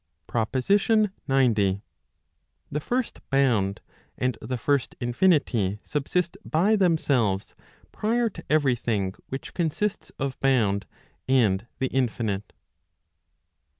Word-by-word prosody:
PROPOSITION 195 - +2 0.2
XC. 110 -8 +3 0.9
The 150 - -1
first 245 - -2
bound, 115 -8 +2 0.4
and 125 0 0
the 125 - -3
first 140 +2 0
infinity 120 - +2
subsist 170 +5 -1
by 190 +8 +2
themselves 140 - +1 0.4
prior 230 +2 +1
to - - -10
every 145 -5 +3
thing 105 -6 -1 0.2
which 135 - -6
consists 180 +5 -1
of 135 -1 -3
bound 105 -8 +2 0.4
and 115 -5 +3
the 130 - -1
infinite. 110 -6 -1
130 Hz, 100 wpm, -26 LUFS, 110-160 Hz, 0.9 s, XC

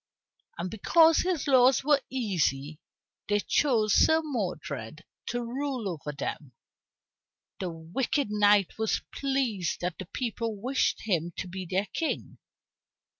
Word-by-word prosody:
And 180 +2 -4
because 320 - +5
his 360 -5 0
laws 260 -1 +5
were 285 0 +4
easy, 160 - -1 0.5
these 205 0 +1
chose 225 -7 +2
Sir 320 0 +5
Modred 175 - -4 0.2
to 245 0 -2
rule 255 -1 -3
over 150 -5 -4
them. 140 -1 -5 1.1
The 185 - -2
wicked 200 - -2
knight 205 -1 +3
was 220 -1 0
pleased 260 - -1
that 180 -1 -3
the 190 - -6
people 230 -1 -3
wished 255 +5 0
him 175 -5 -1
to 185 - -4
be 185 0 -6
their 190 +3 0
king. 325 - -3
210 Hz, 125 wpm, -28 LUFS, 175-265 Hz, 1.1 s, because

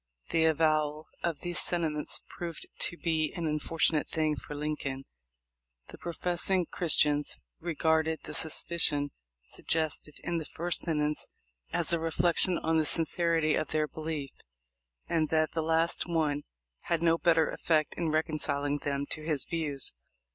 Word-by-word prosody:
The 160 -1 +3
avowal 155 -1 +1
of 170 -3 -2
these 175 0 +1
sentiments 160 -4 +2
proved 170 -2 -6 0.2
to 170 - -11
be 160 -3 0
an 170 - -3
unfortunate 155 0 +1
thing 155 -2 0
for 145 +3 -8
Lincoln. 145 -2 -3 0.8
The - - -10
profess 175 +1 0
ing 185 -2 +3
Christians 150 -3 +1 0.2
regarded 160 -1 +1
the - - -5
suspicion 150 -3 +2 0.3
suggested 155 - -1
in 170 -1 -1
the 160 - -6
first 175 +3 0
sentence 150 -2 0 0.4
as - - +3
a 170 - +2
reflection 170 +2 +2
on 160 0 +1
the 155 - +2
sincerity 165 -1 +3
of - - 0
their 155 -1 0
belief, 155 -3 -5 0.8
and 160 -3 +1
the 155 -1 +3
last 165 +2 +1
one 155 -4 0 0.4
had 170 -1 0
no 165 0 +3
better 165 -2 +3
effect 155 -2 +1
in 170 -2 -2
reconciling 145 -2 0
them 140 -1 -2
to 155 - 0
his 155 -3 -1
views. 150 -5 0
160 Hz, 140 wpm, -30 LUFS, 150-165 Hz, 0.8 s, The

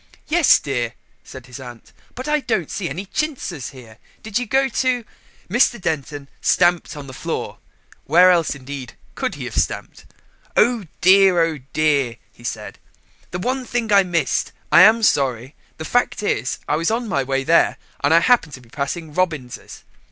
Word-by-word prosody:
"Yes, 330 -1 +5
dear," 120 -5 -3 0.3
said 130 -2 -11
his 125 +1 -10
aunt, 120 -3 -12 0.2
"but 255 +3 -6
I 300 0 +2
don't 220 - -2
see 185 -4 -3
any 180 +8 -5
chintzes 195 - -3
here. 120 -5 -14 0.2
Did 220 +1 -1
you 245 - -4
go 270 +5 +2
to 250 -1 0 0.2
?" - - -31
Mr. 240 +3 +2
Denton 145 -4 -3
stamped 175 -3 +2
on 145 - -8
the 130 - -10
floor - - -5 0.5
(where 180 +5 +6
else, 170 -4 +1
indeed, 135 -2 -8 0.2
could - - -3
he - - -6
have - - -6
stamped?). - - -2 0.5
"Oh 230 -2 +3 0.2
dear, 185 -1 +6
oh 160 -3 -2
dear," 145 -6 +1 0.2
he 120 - -19
said, 110 -3 -6 0.5
"the 180 - -4
one 255 +8 -2
thing 235 -3 -2
I 200 - +7
missed. 175 -3 -1 0.2
I 170 - +8
am 220 +4 +6
sorry. 130 - +1 0.2
The 160 - -6
fact 245 -1 0
is 125 - -1
I 150 - +1
was 165 +1 0
on 230 +1 -1
my 145 -9 0
way 135 0 -1
there 165 +5 +3 0.3
and 145 - +3
I 165 +1 +6
happened 185 -8 +3
to 130 - -9
be 120 - -20
passing 150 +4 -4
Robins's." 155 -8 -3
165 Hz, 180 wpm, -20 LUFS, 135-215 Hz, 0.5 s, I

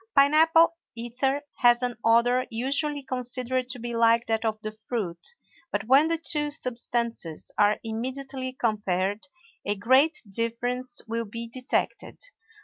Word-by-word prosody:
Pine 280 +1 +6
apple 325 +1 +5 0.2
ether 255 +5 -1
has 240 0 +4
an 245 -1 -1
odor 240 +2 +3
usually 280 +5 -1
considered 255 0 -3
to 255 - -5
be 240 0 -5
like 230 0 +4
that 225 0 0
of 220 -1 -1
the 215 - -3 0.2
fruit, 205 - -3 0.4
but - - -1
when 270 +7 +5
the 330 0 +1
two 300 -2 -1
substances 235 - -3
are 210 0 +4
immediately 260 +3 -4
compared 205 0 -1 0.4
a 205 - -1
great 260 +10 +4
difference 240 +4 -2
will 230 +1 -2
be 230 +3 -6
detected. 250 +3 -2
245 Hz, 140 wpm, -26 LUFS, 230-265 Hz, 0.4 s, Pine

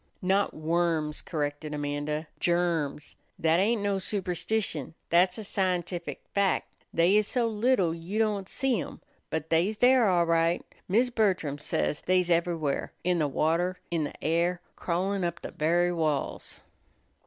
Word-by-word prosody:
"Not 195 +2 +2
worms," 160 -1 0
corrected 150 -1 -3
Amanda; 145 +1 -2
"germs. 170 -4 0 0.2
That 160 +1 +3
ain't 210 +2 +2
no 200 -1 +1
superstition; 180 -4 -2 0.2
that's 180 +2 +4
a 220 - -5
scientific 180 -3 -2
fac'. 200 -1 +2 0.3
They 170 +4 +3
is 210 -1 +2
so 245 -2 +1
little 215 -6 +2
you 170 +5 -5
don't 210 -3 0
see 260 -6 0
'em; - - -8 0.3
but 160 0 -3
they's 180 +7 +2
there 245 -3 +5
all 175 -2 +3
right. 165 +1 +2 0.2
Mis' 235 +6 +2
Bertram 185 - +1
says 150 0 -1
they's 180 -1 +2
ever'where 165 -4 0
in 180 -1 +1
the 150 - +2
water, 165 +6 0
in 165 -3 0
the - - -9
air, 170 +2 +1 0.2
crawlin' 190 +3 -1
up 170 -1 -3
the - - -5
very 175 +3 +2
walls." 155 -4 -2
175 Hz, 145 wpm, -28 LUFS, 160-195 Hz, 0.3 s, there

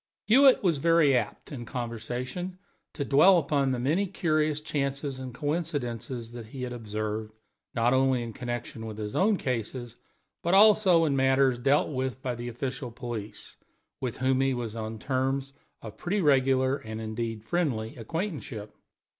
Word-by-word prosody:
Hewitt 260 +4 +6
was 170 -5 +3
very 165 -3 +4
apt, 120 - -2
in 130 -5 -6
conversation, 125 +9 -5 0.4
to 140 - -3
dwell 165 +8 +6
upon 140 -3 +1
the 130 - 0
many 155 +11 +1
curious 155 -5 0
chances 140 -2 -2
and 130 -1 -6
coincidences 125 -5 -3
that 120 -2 -8
he 130 +3 -7
had 125 -1 -4
observed, 110 -1 -4 0.4
not 120 +2 +3
only 130 -2 +3
in 115 -1 -6
connection 120 -2 -5
with 110 -1 -7
his 105 -1 -5
own 205 +2 +3
cases, 120 -2 -4 0.4
but 175 +3 +2
also 195 -5 +6
in 145 -3 +1
matters 135 -1 +3
dealt 140 +4 +3
with 130 -2 -2
by 125 - -1
the 120 0 -6
official 125 +1 -4
police, 115 -3 -7 0.4
with 125 -3 -3
whom 130 0 +2
he 135 -1 +2
was 115 -3 -4
on 110 0 -4
terms 135 +3 -1 0.3
of 110 - -9
pretty 195 +4 -1
regular, 135 -4 +3
and, 110 -3 -7
indeed, 110 0 -4
friendly, 120 -8 -1
acquaintanceship. 130 - -5
130 Hz, 155 wpm, -28 LUFS, 120-150 Hz, 0.4 s, Hewitt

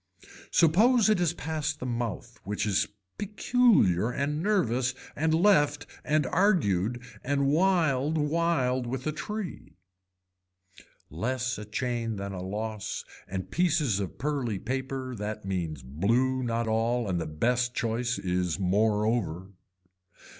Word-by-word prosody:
Suppose 215 +8 +5
it 210 - +2
is 170 -2 +2
past 155 -3 -3
the - - -5
mouth 120 -1 -4
which 105 +1 -2
is 100 -2 +1 0.3
peculiar 205 - +3
and 145 +4 -1
nervous 130 - +1 0.2
and 160 +2 +1
left 155 -5 +3 0.2
and 150 -1 +2
argued 125 - +2 0.2
and 140 +1 +1
whiled 155 -2 +2
whiled 150 -5 +1
with 130 +1 -4
a 155 - 0
tree. 210 +5 -6 1.4
Less 125 - -2
a 105 - -7
chain 115 0 -2
than 100 0 -5
a 90 - -5
loss 105 +2 -4 0.2
and 95 0 -5
pieces 155 - +2
of 100 - -4
pearly 135 -7 -1
paper 130 +3 -3
that 105 -2 -5
means 85 -8 -3
blue 115 - +1
not 115 -1 -1
all 115 +1 +1
and 90 -3 -1
the - - -3
best 125 +11 0
choice 115 +1 -1
is 90 -2 -1
moreover. 100 -2 +1
125 Hz, 125 wpm, -28 LUFS, 105-155 Hz, 1.4 s, Suppose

